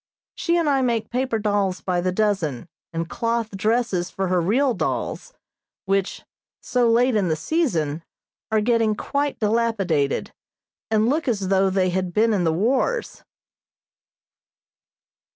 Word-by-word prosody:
She 340 0 0
and 335 -2 +1
I 275 -2 +3
make 235 -3 -1
paper 250 -1 0
dolls 205 -3 0
by 180 -2 -1
the 185 +1 0
dozen, 180 - -1 0.2
and 165 0 -3
cloth 230 +3 -2
dresses 205 -3 0
for 190 -1 -3
her 180 -1 +2
real 250 +9 +2
dolls, 230 - -3 0.5
which, 195 0 -1 0.4
so 245 -2 +1
late 240 +1 +3
in 200 -4 +2
the 160 - +1
season, 165 - -1 0.5
are 220 -1 +2
getting 225 -1 +2
quite 285 +5 -2
dilapidated 210 -10 0 0.6
and 220 0 +2
look 300 +4 0
as 200 -6 0
though 195 0 +3
they 185 -1 +1
had 185 -1 -2
been 225 +1 +3
in 185 -4 +1
the 160 - +3
wars. 250 - 0
210 Hz, 140 wpm, -23 LUFS, 185-240 Hz, 0.6 s, I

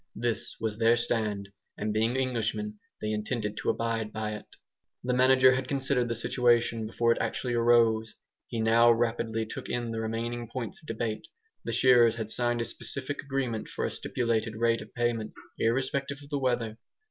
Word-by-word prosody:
This 115 0 -2
was 110 -1 -3
their 115 +1 +5
stand. 110 -4 -1 0.3
And 105 0 -2
being 115 +4 +1
Englishmen 110 -5 -1 0.2
they 105 - -1
intended 105 0 -2
to - - -1
abide 115 -2 -1
by 110 -1 -3
it. 105 - -8 0.6
The 125 0 0
manager 130 +1 +6
had 130 0 -1
considered 135 -3 0
the 115 - -2
situation 115 -1 +2
before 115 +1 +2
it - - +1
actually 125 -2 -2
arose. 115 -2 +3 0.3
He 115 - -3
now 115 +1 +6
rapidly 115 -1 0
took 110 - -7
in 120 -1 -2
the 115 0 -3
remaining 115 +1 -3
points 115 -4 -5
of 155 - -18
debate. 110 -2 -3 0.4
The - - -2
shearers 120 -1 +5
had 110 -1 -4
signed 120 -1 +1
a - - -1
specific 135 +4 -2
agreement 135 -5 -2
for - - -3
a - - -2
stipulated 115 -2 -1
rate 115 +1 +2
of 110 - -11
payment, 120 -2 -1 0.3
irrespective 135 +4 0
of 140 - -15
the 145 - 0
weather. 120 -4 -1
115 Hz, 175 wpm, -29 LUFS, 110-125 Hz, 0.6 s, manager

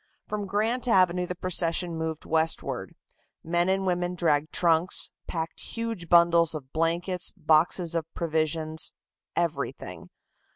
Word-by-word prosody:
From 205 -1 -4
Grant 225 +6 0
Avenue 180 -4 +3
the 180 - -4
procession 175 -1 0
moved 160 -1 -4
westward. 160 0 0 0.5
Men 175 +2 +1
and 190 0 +1
women 180 -1 0
dragged 155 -3 +1
trunks, 170 0 +2 0.2
packed 165 -1 -4
huge 225 -7 -5
bundles 170 -1 +5
of 135 -3 -8
blankets, 170 +3 0
boxes 165 +2 +2
of 165 -1 -3
provisions 160 -1 -1 0.4
everything. - - -3
170 Hz, 120 wpm, -27 LUFS, 160-180 Hz, 0.5 s, bundles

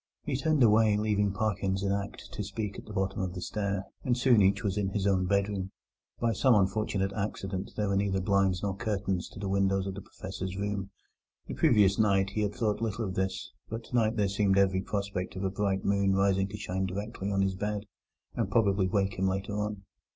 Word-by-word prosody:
He 145 - -2
turned 150 0 +2
away, 110 -1 +5
leaving 105 -1 +1
Parkins 100 -2 -1
in 100 - +1
act 100 0 -4
to 105 - -4
speak 100 0 -4
at - - -12
the - - -8
bottom 95 -1 -1
of 90 -1 -3
the 90 - -5
stair, 100 -2 -2 0.2
and 125 -1 +1
soon 120 -3 +5
each 95 +3 +3
was 100 -3 0
in 100 -2 0
his 95 0 -2
own 95 -2 +2
bedroom. 100 -1 0 0.5
By 115 -1 +1
some 125 +4 +4
unfortunate 100 -1 +1
accident, 100 -2 -3
there 105 -1 0
were 100 - +1
neither 100 -1 +1
blinds 95 -1 +2
nor 100 -2 -1
curtains 100 -4 -2
to - - -11
the 100 - -3
windows 95 0 +1
of 95 - -3
the 100 - -7
Professor's 95 0 -6
room. 100 -1 -2 0.6
The - - -6
previous 100 -3 +4
night 100 -2 +3
he 105 - -1
had 105 0 -1
thought 110 -2 0
little 115 0 -1
of 95 - -4
this, 95 0 -2 0.2
but 115 +1 -5
tonight 115 -1 +1
there 105 -2 +3
seemed 100 0 +2
every 95 -1 +3
prospect 100 -3 -3
of 95 - -4
a 95 - 0
bright 95 -1 -1
moon 100 -1 +2
rising 95 0 +2
to 100 +1 -7
shine 95 -2 -2
directly 100 +1 -4
on 95 0 +2
his 95 -1 +1
bed, 105 +2 -3 0.5
and 115 -5 -1
probably 100 -3 +3
wake 95 0 0
him 95 - +2
later 95 +2 -2
on. 105 -1 -3
100 Hz, 215 wpm, -29 LUFS, 95-105 Hz, 0.6 s, away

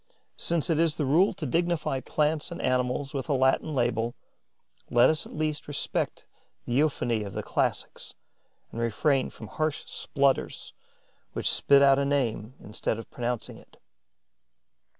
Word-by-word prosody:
Since 170 -1 +1
it 160 - +2
is 165 -2 +2
the 150 - -1
rule 165 +9 +4
to 175 -5 -5
dignify 165 -1 0
plants 150 +3 0
and 170 - -6
animals 130 +2 0
with 135 -3 -4
a - - +3
Latin 130 +3 +2
label, 120 -2 0 0.7
let 120 +5 +5
us 155 - -2
at - - -11
least 155 -1 -2
respect 145 -1 -2 0.4
the 120 - -3
euphony 125 -5 +1
of 100 -2 -6
the - - -4
classics - - -2 0.6
and 115 - -5
refrain 130 +4 +1
from 110 - -11
harsh 155 +6 -2
splutters 140 -1 -1 0.6
which - - -2
spit 140 0 +5
out 135 0 +6
a 140 - +1
name 130 -4 -1
instead 105 +1 -3
of 115 - -9
pronouncing 120 -1 -4
it. - - -21
140 Hz, 150 wpm, -27 LUFS, 120-155 Hz, 0.7 s, out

